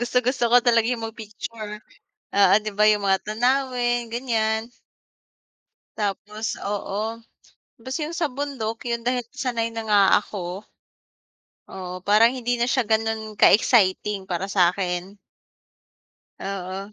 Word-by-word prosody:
gustong-gusto 250 +1 +1
ko 245 - +7
talaga 230 -2 +3
yung 235 -2 -2
mag-picture, 215 -1 -8 0.6
oo 200 0 +5
'di 215 0 -4
ba 210 +1 +2
yung 210 -1 +2
mga 190 -1 +2
tanawin, 240 +1 0
ganiyan. 225 -2 -1 1.3
Tapos 210 +2 -3
oo, 205 +2 -3 0.6
basta 260 +6 -4
yung 330 +2 -6
sa 330 -2 0
bundok 250 -5 -4
yun 235 0 -2
dahil 245 0 0
sanay 240 -5 -1
na 225 0 -5
nga 205 -1 +5 0.2
ako 190 -1 -6 1.1
Oo, 185 -1 -7
parang 215 +5 +4
hindi 245 -1 -1
na 235 - +1
siya 250 -2 +1
ganon 220 -1 -1
ka-exciting 205 -3 +4
para 190 +1 -3
sa 180 -3 +3
akin. 180 0 -3 1.3
Oo. 195 +1 -5
220 Hz, 125 wpm, -23 LUFS, 200-240 Hz, 1.3 s, ko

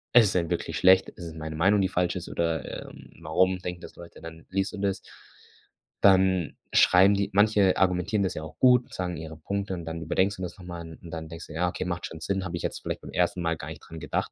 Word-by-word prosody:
„Ist 120 -3 +8
es - - 0
denn 85 -3 0
wirklich 85 -2 -2
schlecht? 95 +3 +5
Ist 85 - -10
es 80 - -7
meine 80 -1 -6
Meinung, 95 +5 +4
die 95 - +1
falsch 90 -2 0
ist 90 -1 -6
oder, 80 -4 -2
ähm, - - -14
warum 90 +4 +2
denken 90 -1 -6
das - - -12
Leute?" 85 -1 -12
Dann 80 0 -10
liest 95 +2 -1
du - - -8
das. 100 -1 -1 1.1
Dann 95 -3 +4 0.2
schreiben 95 +3 +6
die 100 0 0
manche 105 -2 +4
argumentieren 95 +2 +1
das 95 - -1
ja 80 - -6
auch 80 - -10
gut, 125 -1 +4
sagen 90 -1 -3
ihre 80 0 -8
Punkte 100 +4 -3
und 85 -2 -5
dann 80 0 -5
überdenkst 95 +5 +1
du 95 - -10
das 90 - -5
noch 90 - -12
mal 85 -1 -6
n 80 -1 -10
und 85 - -11
dann 80 -1 -6
denkst 80 +1 -9
du: - - -10
„Ja, 90 +3 +1
okay, 90 - -4
macht 85 -1 -3
schon 80 - -8
Sinn, 95 +3 -2
habe 85 -1 -4
ich 85 - -7
jetzt - - -3
vielleicht - - -4
beim - - -10
1. 90 0 0
Mal 85 -1 0
gar 75 - -7
nicht 80 -3 -9
dran 80 0 -9
gedacht." 75 - -2
90 Hz, 260 wpm, -27 LUFS, 80-95 Hz, 1.1 s, Ist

